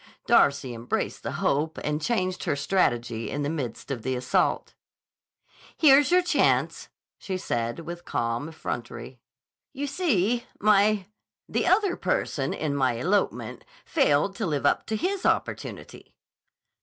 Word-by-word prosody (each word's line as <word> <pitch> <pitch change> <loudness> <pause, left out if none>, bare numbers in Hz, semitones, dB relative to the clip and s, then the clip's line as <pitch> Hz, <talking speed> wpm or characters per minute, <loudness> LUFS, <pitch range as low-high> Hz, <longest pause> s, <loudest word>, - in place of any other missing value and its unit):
Darcy 140 -3 +3
embraced 115 +1 -3
the - - -4
hope 150 +3 0
and 150 +1 -2
changed 185 -3 -1
her - - +1
strategy 120 -8 0
in 145 - -3
the 145 - -1
midst 140 -3 -5
of 125 -4 -3
the 130 +3 -2
assault. 125 0 0 1.0
"Here's 285 -2 +6
your 360 +1 +4
chance," 355 - +1 0.3
she 190 -2 -4
said 120 -5 -2
with 170 +1 -8
calm 115 +3 -2
effrontery. 120 -5 -6 0.5
"You 285 +1 -3
see, 245 - 0
my—the 210 -1 0
other 380 -1 +3
person - - -1
in 150 -2 -2
my 130 -3 +2
elopement 185 - -1 0.2
failed 195 - +2
to 220 -5 -1
live 145 -3 -1
up - - +2
to 220 - -1
his 375 - -2
opportunity." - - -3
165 Hz, 130 wpm, -26 LUFS, 130-220 Hz, 1.0 s, Here's